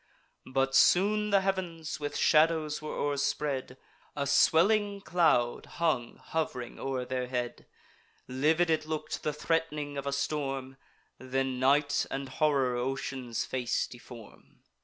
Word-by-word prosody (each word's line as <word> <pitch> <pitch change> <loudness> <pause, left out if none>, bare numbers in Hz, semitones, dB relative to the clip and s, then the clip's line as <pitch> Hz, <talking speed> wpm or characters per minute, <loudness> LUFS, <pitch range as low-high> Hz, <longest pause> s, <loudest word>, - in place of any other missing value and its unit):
But 135 0 +1
soon 210 +7 +4
the 200 -1 +4
heav'ns 180 -5 -3
with 145 -1 -4
shadows 155 -1 +3
were 155 - -5
o'erspread; 140 -2 -1 0.4
A 140 -1 -1
swelling 200 +8 +3
cloud 160 -11 +2
hung 155 -8 0
hov'ring 125 -7 -4
o'er 130 -2 -2
their 125 0 -3
head: 125 -1 -4 0.6
Livid 160 +6 +2
it 155 -1 0
look'd, 155 -1 -4
the 150 - -1
threat'ning 150 -2 -2
of 140 - -6
a - - 0
storm: 135 -2 -3 0.4
Then 130 0 -2
night 145 +3 +2
and 135 0 -4
horror 140 -5 +1
ocean's 130 -1 -3
face 125 -1 -1
deform. 120 -3 -14
145 Hz, 125 wpm, -30 LUFS, 130-160 Hz, 0.6 s, soon